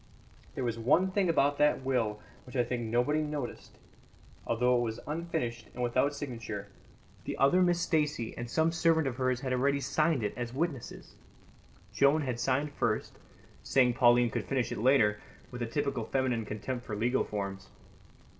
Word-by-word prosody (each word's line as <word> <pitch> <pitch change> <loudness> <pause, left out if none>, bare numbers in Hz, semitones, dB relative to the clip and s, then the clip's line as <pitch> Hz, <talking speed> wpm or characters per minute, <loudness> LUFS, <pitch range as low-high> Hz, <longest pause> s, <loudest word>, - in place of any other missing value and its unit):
There 130 - -2
was 115 -2 -2
one 175 +11 +3
thing 190 -2 +1
about 145 -3 +2
that 150 -2 +3
will 115 -5 0 0.3
that 125 - -11
I 125 - +3
think 120 0 -3
nobody 125 +7 +2
noticed: 150 -4 -5 0.7
although 125 +2 +2
it 120 - +2
was 115 -1 -3
unfinished 135 -8 -3
and 125 - -3
without 130 +4 +1
signature, 115 -7 -6 0.6
the - - -4
other 160 +7 +4
Miss 175 -1 +3
Stacey 150 -9 0
and 120 0 -6
some 160 +6 +2
servant 165 -1 +2
of 125 -3 -3
hers 130 -1 0
had 130 -1 -2
already 140 +2 +2
signed 155 0 +1
it 105 - -1
as 120 0 -5
witnesses. 145 -5 -4 0.8
Joan 140 +5 +3
had 125 -3 -3
signed 135 +4 0
first, 110 -6 -2 0.4
saying 125 -2 +3
Pauline 120 -1 +4
could - - -3
finish 130 -3 -1
it - - -3
later, 110 -4 +4 0.3
with 125 -1 -7
a 120 - -1
typical 140 +3 -2
feminine 130 -4 0
contempt 120 +4 -4
for 110 - -5
legal 120 +5 +1
forms. 100 -2 -5
130 Hz, 170 wpm, -30 LUFS, 120-145 Hz, 0.8 s, other